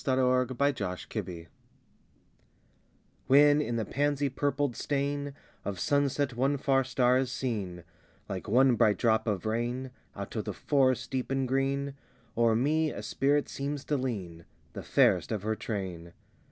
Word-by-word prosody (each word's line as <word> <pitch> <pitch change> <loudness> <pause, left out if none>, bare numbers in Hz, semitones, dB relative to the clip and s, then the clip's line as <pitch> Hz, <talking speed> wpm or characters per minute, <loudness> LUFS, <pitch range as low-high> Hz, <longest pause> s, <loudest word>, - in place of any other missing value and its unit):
THE 130 - +1
WORLD 125 -1 +2
OF 140 0 +3
FAERY 90 -3 -4
I - - -21 1.8
When 145 +2 +6
in 120 -4 -2
the 110 -2 -1
pansy 145 0 0
purpled 140 -1 -1
stain 140 0 -2 0.3
Of 100 -3 -4
sunset 140 0 +1
one 135 +4 +1
far 135 0 +2
star 125 0 +2
is 130 -2 -1
seen, 105 -8 -3 0.4
Like 95 -3 -5
one 130 +1 +5
bright 105 -1 +4
drop 110 -1 +2
of 105 -1 -1
rain, 120 +4 -2 0.2
Out - - -7
of - - -2
the - - -3
forest, 130 -3 +1
deep 130 -2 -2
and 135 -1 0
green, 135 +1 0 0.4
O'er 115 -1 +3
me 155 +6 +2
a - - -6
Spirit 145 +1 +1
seems 140 0 -4
to 150 - -1
lean, 95 - -4 0.3
The - - -6
fairest - - +3
of 105 -3 -2
her 110 +1 0
train. 95 -7 -5
130 Hz, 155 wpm, -29 LUFS, 110-140 Hz, 1.8 s, When